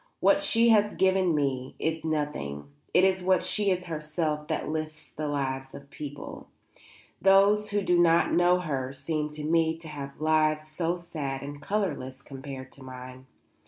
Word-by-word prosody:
What -, -, +4 dB
she 230 Hz, +1 st, +4 dB
has 210 Hz, -2 st, +4 dB
given 190 Hz, -3 st, +3 dB
me 135 Hz, -3 st, -1 dB
is 160 Hz, 0 st, -2 dB
nothing. 145 Hz, -, -3 dB, 0.2 s
It 180 Hz, -, +4 dB
is 190 Hz, -1 st, +3 dB
what 185 Hz, 0 st, +3 dB
she 205 Hz, -2 st, +1 dB
is 180 Hz, -1 st, 0 dB
herself 155 Hz, -1 st, -2 dB
that -, -, -2 dB
lifts 155 Hz, -1 st, -4 dB
the 155 Hz, 0 st, -4 dB
lives 135 Hz, -2 st, -3 dB
of -, -, -8 dB
other 140 Hz, -, -25 dB
people. 145 Hz, -1 st, -8 dB, 0.7 s
Those 200 Hz, +2 st, +5 dB
who 205 Hz, -1 st, 0 dB
do 180 Hz, -2 st, +3 dB
not 170 Hz, -1 st, +4 dB
know 180 Hz, +1 st, +4 dB
her 135 Hz, -5 st, -3 dB
seem 150 Hz, +2 st, -2 dB
to 150 Hz, 0 st, -6 dB
me 160 Hz, +1 st, +2 dB
to 165 Hz, 0 st, -10 dB
have 140 Hz, -2 st, -7 dB
lives 155 Hz, 0 st, +2 dB
so 165 Hz, +3 st, -1 dB
sad 145 Hz, -6 st, -5 dB
and 145 Hz, +1 st, -7 dB
colourless 150 Hz, -9 st, -2 dB
compared 135 Hz, -1 st, -8 dB
to 140 Hz, -, -14 dB
mine. 130 Hz, 0 st, -10 dB
155 Hz, 170 wpm, -28 LUFS, 140-180 Hz, 0.7 s, Those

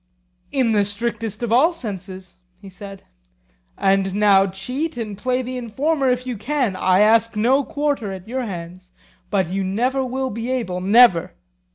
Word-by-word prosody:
In 255 Hz, -4 st, +1 dB
the 210 Hz, -2 st, +3 dB
strictest 215 Hz, +1 st, -4 dB
of 235 Hz, -, -2 dB
all 270 Hz, +9 st, +5 dB
senses, 190 Hz, -, -8 dB, 0.2 s
he 195 Hz, -1 st, -12 dB
said. 195 Hz, 0 st, -10 dB, 0.7 s
And 195 Hz, 0 st, +1 dB
now 200 Hz, -2 st, +4 dB
cheat 250 Hz, -, -4 dB
and 215 Hz, -3 st, -4 dB
play 255 Hz, +5 st, -1 dB
the 255 Hz, +1 st, -5 dB
informer 270 Hz, +4 st, 0 dB
if 250 Hz, 0 st, 0 dB
you 250 Hz, -3 st, -4 dB
can; 250 Hz, -3 st, -1 dB
I 185 Hz, +1 st, +3 dB
ask 225 Hz, +1 st, +4 dB
no 255 Hz, +6 st, +3 dB
quarter 285 Hz, -8 st, -2 dB
at 190 Hz, 0 st, -9 dB
your 260 Hz, +3 st, -3 dB
hands. 180 Hz, 0 st, -8 dB, 0.4 s
But 190 Hz, -4 st, 0 dB
you 195 Hz, +1 st, -2 dB
never 245 Hz, +8 st, 0 dB
will 260 Hz, +1 st, -3 dB
be 230 Hz, +3 st, -5 dB
able, 225 Hz, -9 st, -2 dB
never. 185 Hz, -4 st, +5 dB
220 Hz, 165 wpm, -21 LUFS, 195-255 Hz, 0.7 s, all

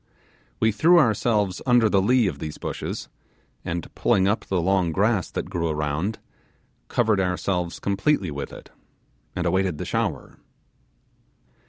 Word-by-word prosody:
We 110 Hz, -, +3 dB
threw 165 Hz, +13 st, +5 dB
ourselves 110 Hz, -, +2 dB
under 120 Hz, -2 st, +5 dB
the 100 Hz, -2 st, +3 dB
lee 120 Hz, +4 st, +3 dB
of 80 Hz, -8 st, -2 dB
these 75 Hz, -1 st, -6 dB
bushes, -, -, -5 dB, 0.6 s
and 85 Hz, 0 st, -5 dB
pulling 95 Hz, -1 st, +2 dB
up 100 Hz, +3 st, 0 dB
the 95 Hz, -, 0 dB
long 90 Hz, -1 st, +1 dB
grass 100 Hz, +2 st, +1 dB
that -, -, -4 dB
grew 85 Hz, -1 st, -1 dB
around, 75 Hz, +7 st, -2 dB, 0.7 s
covered 110 Hz, -4 st, +1 dB
ourselves 90 Hz, -1 st, -1 dB
completely 100 Hz, -, 0 dB
with 70 Hz, 0 st, -5 dB
it, -, -, -12 dB, 0.6 s
and -, -, -2 dB
awaited 95 Hz, -4 st, +1 dB
the -, -, -5 dB
shower. -, -, -3 dB
95 Hz, 140 wpm, -24 LUFS, 85-110 Hz, 0.7 s, threw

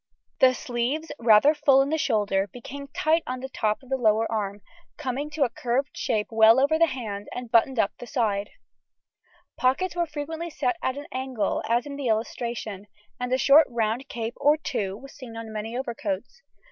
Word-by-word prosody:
The 255 Hz, -1 st, +6 dB
sleeves, 250 Hz, +8 st, -2 dB
rather 230 Hz, +5 st, +6 dB
full 295 Hz, -3 st, +4 dB
in 275 Hz, -, -3 dB
the 315 Hz, -, +1 dB
shoulder, 205 Hz, -7 st, +1 dB
became 275 Hz, +6 st, -9 dB
tight 315 Hz, +4 st, +1 dB
on 255 Hz, 0 st, -3 dB
the 265 Hz, +1 st, -6 dB, 0.5 s
lower 220 Hz, -3 st, +3 dB
arm, 205 Hz, -2 st, -2 dB, 0.4 s
coming 285 Hz, 0 st, -3 dB
to 300 Hz, -1 st, 0 dB
a 255 Hz, -, +2 dB
curved 255 Hz, +5 st, -1 dB
shape 210 Hz, -1 st, 0 dB
well 225 Hz, +2 st, +6 dB
over 300 Hz, +4 st, +3 dB
the 335 Hz, -, +6 dB
hand, 215 Hz, -7 st, -5 dB
and 245 Hz, -2 st, -6 dB
buttoned 240 Hz, +2 st, +3 dB
up 205 Hz, -2 st, +2 dB
the 245 Hz, -, -8 dB
side. 210 Hz, -7 st, 0 dB, 1.1 s
The -, -, -15 dB
pockets 300 Hz, +9 st, +1 dB
were 345 Hz, -1 st, 0 dB
frequently 315 Hz, +3 st, -5 dB
set 355 Hz, +3 st, -1 dB
at 260 Hz, +1 st, -1 dB
an 290 Hz, -, -6 dB
angle, 255 Hz, -6 st, -2 dB
as 235 Hz, +1 st, +2 dB
in 285 Hz, -1 st, -7 dB
illustration, 225 Hz, -4 st, -2 dB, 0.3 s
and 250 Hz, 0 st, -3 dB
a 255 Hz, -, +3 dB
short 285 Hz, +4 st, +6 dB
round 235 Hz, +3 st, -1 dB
cape, 230 Hz, 0 st, -4 dB
or 295 Hz, +2 st, +4 dB
two, 200 Hz, -10 st, -3 dB
was 275 Hz, +4 st, -12 dB
seen 235 Hz, -4 st, -10 dB
on 225 Hz, -1 st, -7 dB
many 220 Hz, +3 st, -4 dB
overcoats. 235 Hz, -, -4 dB
250 Hz, 180 wpm, -26 LUFS, 220-285 Hz, 1.1 s, The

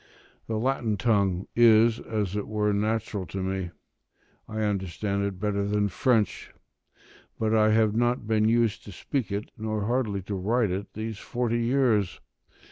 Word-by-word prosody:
The 110 Hz, -, -2 dB
Latin 115 Hz, -3 st, 0 dB
tongue 100 Hz, -5 st, +1 dB
is 115 Hz, -1 st, +5 dB
as 105 Hz, -4 st, -3 dB
it 105 Hz, -, -3 dB
were 105 Hz, -1 st, 0 dB
natural 105 Hz, -2 st, -1 dB
to 95 Hz, -1 st, -4 dB
me; 95 Hz, -1 st, -2 dB, 0.8 s
I 110 Hz, 0 st, -4 dB
understand 100 Hz, 0 st, -1 dB
it 100 Hz, -2 st, -4 dB
better 100 Hz, 0 st, 0 dB
than 105 Hz, 0 st, +1 dB
French; 110 Hz, +3 st, 0 dB, 0.9 s
but 110 Hz, 0 st, 0 dB
I 110 Hz, -1 st, +4 dB
have 110 Hz, -1 st, +3 dB
not 120 Hz, 0 st, +1 dB
been 110 Hz, 0 st, +2 dB
used 115 Hz, -2 st, +1 dB
to 105 Hz, -, -9 dB
speak 120 Hz, +4 st, -3 dB
it, 100 Hz, +2 st, -4 dB
nor 110 Hz, -1 st, -2 dB
hardly 110 Hz, -5 st, -1 dB
to 100 Hz, -, -5 dB
write 105 Hz, +3 st, +1 dB
it, 95 Hz, +3 st, -4 dB
these 110 Hz, -1 st, -5 dB
forty 120 Hz, -1 st, -1 dB
years. 120 Hz, -5 st, +1 dB
110 Hz, 155 wpm, -27 LUFS, 100-115 Hz, 0.9 s, is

